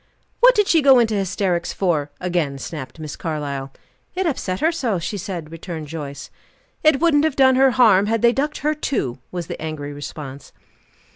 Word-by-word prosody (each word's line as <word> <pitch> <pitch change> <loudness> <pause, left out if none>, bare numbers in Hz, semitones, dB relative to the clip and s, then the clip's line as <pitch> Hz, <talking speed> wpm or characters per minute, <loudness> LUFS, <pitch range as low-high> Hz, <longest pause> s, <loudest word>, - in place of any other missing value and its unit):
"What - - +7
did 415 -2 +3
she 325 - +4
go 270 -2 +7
into 230 -2 +3
hysterics 185 -3 -1
for?" 160 -7 0
again 170 -6 -1
snapped 130 -1 -7
Miss 155 -2 -7
Carlyle. 140 -4 -4 0.4
"It 375 +1 -1
upset 195 - -2
her 325 - +2
so, 255 - -1
she 170 +5 -4
said," 175 -5 -6
returned 165 -2 -7
Joyce. 145 -3 -7 0.5
"It 310 -3 +4
wouldn't 320 -3 +3
have 315 -3 +1
done 260 -1 +5
her 265 +1 +5
harm 215 -6 +4
had 225 +1 0
they 235 0 +5
ducked 295 +3 -2
her 305 - +3
too," 245 - -2
was 175 -2 -4
the - - -7
angry 150 -2 -5
response. 145 -1 -8
185 Hz, 185 wpm, -21 LUFS, -, 0.5 s, What